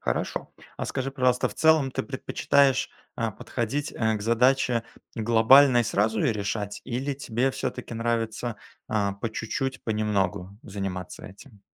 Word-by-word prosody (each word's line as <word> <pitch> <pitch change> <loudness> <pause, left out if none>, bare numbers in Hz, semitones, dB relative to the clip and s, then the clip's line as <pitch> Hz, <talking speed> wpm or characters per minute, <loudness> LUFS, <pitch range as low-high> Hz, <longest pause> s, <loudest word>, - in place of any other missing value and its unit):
Хорошо. - - -2 0.3
А - - -3
скажи, 135 +1 -3
пожалуйста, 130 -2 +1
в - - -11
целом 160 -4 +4
ты 135 - -2
предпочитаешь, 135 0 +1 0.3
а, 115 -2 -1
подходить, 130 +9 -3
э, 110 -1 0
к 105 - -6
задаче 120 +1 +3 0.3
глобально 120 +4 +6
и - - +4
сразу 110 0 +1
её - - +2
решать, 105 0 -3
или 130 +4 -2
тебе 130 -1 -1
всё-таки 125 -2 -5
нравится, 115 0 -2 0.3
а, 100 -2 0
по 100 +3 -3
чуть-чуть, 130 +4 -3
понемногу 100 -3 -1
заниматься 95 -3 -6
этим? 100 +2 -14
115 Hz, 145 wpm, -26 LUFS, 105-130 Hz, 0.3 s, глобально